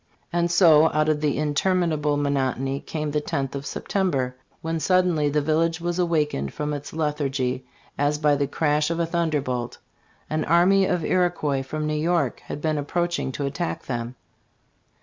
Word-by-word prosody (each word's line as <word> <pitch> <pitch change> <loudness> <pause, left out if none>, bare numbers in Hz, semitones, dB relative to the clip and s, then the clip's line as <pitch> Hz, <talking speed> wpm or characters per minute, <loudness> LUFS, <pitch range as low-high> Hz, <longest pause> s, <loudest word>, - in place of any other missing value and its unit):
'' - - -37
And 170 0 +1
so 160 -3 +6
out 155 +1 +2
of 150 -1 +1
the 150 -3 +1
interminable 150 0 +1
monotony 135 -1 0
came 150 -1 -4
the 150 0 0
loth 135 -1 -1
of 140 0 -5
September; 140 -7 -1 0.3
when 165 0 -1
"suddenly 180 -4 +2
the 150 0 0
village 160 +2 +1
was 175 +1 -2
awakened 150 - 0
from 150 0 -2
its 145 -1 -6
lethargy 135 -5 -2 0.3
as 145 +1 +2
by 150 -1 +3
the 140 0 0
crash 150 +1 +1
of 170 0 -2
a 170 - +2
thunderbolt." 145 -8 -1 0.5
An 155 0 -1
army 190 +3 +4
of 180 -4 0
Iroquois 175 -7 +1
from 155 +3 -4
New 155 - -1
York 155 -3 0
had 145 - -6
been 155 -1 0
seen - - 0
approach 175 +4 -1
ing - - -2
to 140 - -3
attack 155 +5 -3
them. 120 -1 -4
150 Hz, 175 wpm, -24 LUFS, 140-170 Hz, 0.5 s, so